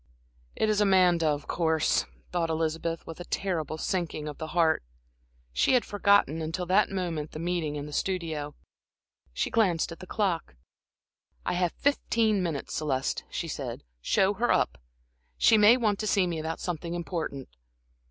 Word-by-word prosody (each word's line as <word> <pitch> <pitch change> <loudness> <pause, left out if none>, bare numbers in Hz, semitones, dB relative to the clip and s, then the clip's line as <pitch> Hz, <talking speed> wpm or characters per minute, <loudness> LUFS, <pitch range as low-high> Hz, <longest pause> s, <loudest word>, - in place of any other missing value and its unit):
"It 220 - +1
is 210 -1 +2
Amanda, 180 -4 +4
of 145 -1 0
course," 160 -2 +1 0.2
thought 170 -2 0
Elizabeth, 165 +1 -2
with 165 - -9
a - - -5
terrible 170 -6 -2
sinking 165 -3 -2
of 150 - -7
the 160 - -4
heart. 160 -2 +4 0.7
She 260 - +3
had 245 - +2
forgotten, 200 -6 +3
until 160 +3 -3
that 190 +4 +3
moment, 170 -6 -3
the - - -6
meeting 170 -3 -1
in 145 -1 -4
the 150 - -9
studio. 160 -5 -2 0.8
She - - -2
glanced 185 -8 +2
at 165 - -9
the 185 - -10
clock. 180 - -1 0.9
"I - - 0
have 175 -1 0
fifteen 230 -7 +1
minutes, 165 -6 -3
Celeste," 135 -4 -1
she - - -4
said. - - -5 0.2
"Show 195 - +2
her 235 +4 +1
up. - - +1 0.6
She 220 - +6
may 215 +3 +7
want 215 -5 +1
to 215 - -2
see 200 -3 +3
me 170 -2 -2
about 160 +1 -4
something 170 -1 -4
important." 165 -6 -4
170 Hz, 160 wpm, -28 LUFS, 160-195 Hz, 0.9 s, may